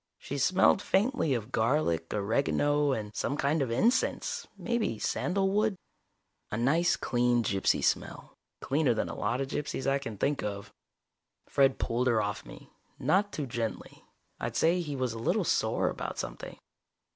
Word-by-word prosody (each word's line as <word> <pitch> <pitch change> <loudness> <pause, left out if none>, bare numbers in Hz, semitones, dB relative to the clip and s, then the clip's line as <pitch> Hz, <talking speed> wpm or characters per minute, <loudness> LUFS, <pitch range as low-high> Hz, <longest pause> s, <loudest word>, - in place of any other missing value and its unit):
She 140 - -5
smelled 185 +6 +4
faintly 195 - +1
of 110 -3 -5
garlic, 110 - +1
oregano 140 +7 +1
and 105 -4 -4
some 145 - -1
kind 145 +3 +1
of 135 - 0
incense, 245 - +1
maybe 235 - -1
sandalwood. 195 - 0 0.7
A 105 - -3
nice 155 +9 +3
clean 120 -1 +1
gypsy 100 -2 +1
smell. - - -1 0.3
Cleaner 140 -4 +1
than - - -1
a - - -5
lot 115 +5 -1
of 135 - -2
gypsies 140 -1 -3
I 135 0 +2
can 115 -6 -7
think 140 +7 0
of. 100 -1 -5 0.7
Fred 135 -1 +3
pulled 120 +2 0
her 115 -3 +3
off 105 -1 -3
me, - - -13 0.3
not 200 +2 +2
too 150 - -3
gently. 120 -3 -5 0.4
I'd - - -4
say 170 +2 +3
he 150 -4 -4
was 130 -3 -1
a 115 - -6
little 115 - +1
sore - - +1
about - - -5
something. - - -6
135 Hz, 155 wpm, -29 LUFS, 115-160 Hz, 0.7 s, smelled